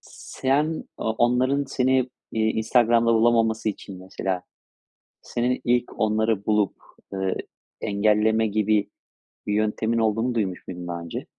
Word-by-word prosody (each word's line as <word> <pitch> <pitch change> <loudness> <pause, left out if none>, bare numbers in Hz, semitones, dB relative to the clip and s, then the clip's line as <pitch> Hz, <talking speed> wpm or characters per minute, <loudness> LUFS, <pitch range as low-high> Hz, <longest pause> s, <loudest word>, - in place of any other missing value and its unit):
s - - -13
sen, 150 +4 +1
o - - -5
onların 130 +4 +2
seni, 130 -1 +1 0.2
eee, 110 - 0
Instagram'da 115 +1 +3
bulamaması 115 -1 +3
için, 100 -2 -6
mesela, 95 -1 -3 0.8
senin 125 +1 -1
ilk 120 0 0
onları 110 -1 +1
bulup, 105 -2 +2 0.4
ııı, 95 -1 -1 0.5
engelleme 105 +2 +2
gibi 105 0 +1 0.6
bir 105 - 0
yöntemin 110 +2 0
olduğunu 115 +2 +1
duymuş 95 -5 -2
muydun 90 -1 -7
daha 85 -1 -4
önce? 85 - -6
110 Hz, 125 wpm, -24 LUFS, 105-120 Hz, 0.8 s, Instagram'da